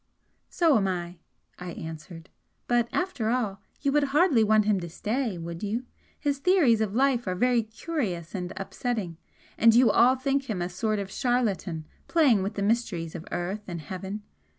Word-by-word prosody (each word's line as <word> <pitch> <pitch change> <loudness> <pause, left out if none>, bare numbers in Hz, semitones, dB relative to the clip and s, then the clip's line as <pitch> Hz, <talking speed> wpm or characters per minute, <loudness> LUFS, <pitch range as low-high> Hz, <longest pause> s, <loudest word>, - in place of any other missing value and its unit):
"So 330 -7 +3
am 195 -2 +1
I," 175 -1 -4 0.4
I 180 -1 -6
answered 160 +2 -9 0.4
"But, 240 -1 +2
after 355 -12 -1
all 215 -6 -1 0.2
you 280 - +1
would 295 0 +3
hardly 285 -4 +4
want 215 0 +4
him 210 -2 +2
to 170 -1 -6
stay, 220 +3 -2
would 170 0 -6
you? 220 +5 -2 0.3
His 285 -2 -1
theories 280 - +4
of 210 -1 -1
life 255 -3 +2
are 185 - 0
very 245 +4 +3
curious 220 - -4
and 180 -2 -4
upsetting, 195 -3 -3 0.4
and 225 0 +6
you 240 -2 +6
all 250 +5 +5
think 270 0 -1
him 205 -5 -2
a 175 0 -2
sort 215 +4 -1
of 195 -1 -4
charlatan 200 -11 -1 0.2
playing 280 - +4
with 195 +2 -3
the 200 - -1
mysteries 200 -7 0
of 170 -2 -8
earth 185 +4 -3
and 170 -2 -5
heaven! 190 +6 -6
215 Hz, 175 wpm, -27 LUFS, 180-250 Hz, 0.4 s, and